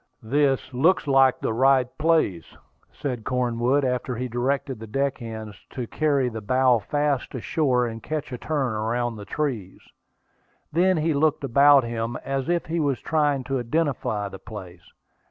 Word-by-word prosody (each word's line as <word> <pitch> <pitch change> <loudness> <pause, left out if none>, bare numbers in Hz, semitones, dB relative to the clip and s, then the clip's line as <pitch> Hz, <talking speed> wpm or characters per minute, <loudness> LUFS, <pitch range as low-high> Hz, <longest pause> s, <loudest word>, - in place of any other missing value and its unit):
"This 135 +1 +1
looks 160 +10 +3
like 135 -2 +4
the - - -1
right 130 +1 +4
place," 155 - +1 0.3
said 125 -5 -4
Cornwood, 125 +2 +1
after 125 0 -1
he 125 - -3
had 125 - -7
directed 130 +1 -1
the 110 - -8
deck 135 +4 -1
hands 110 -3 -7 0.2
to 125 -3 -3
carry 140 0 +1
the 110 -2 -5
bow 130 +2 +3
fasts 145 +2 -1
ashore 130 0 +1
and 115 -1 -5
catch 155 -4 -4
a 125 - -5
turn 140 -6 -1
around 115 +2 -1
the 105 -1 -9
trees. 115 -10 -3 0.9
Then 180 +3 +3
he 160 +1 +1
looked 150 +1 +1
about 140 +1 +6
him, 115 0 -3
as 135 0 -2
if 175 -1 +1
he 165 +1 -2
was 140 -4 0
trying 145 -4 +1
to 135 0 -2
identify 120 -6 -1
the 95 -1 -9
place. 95 -5 -10
130 Hz, 165 wpm, -24 LUFS, 115-145 Hz, 0.9 s, about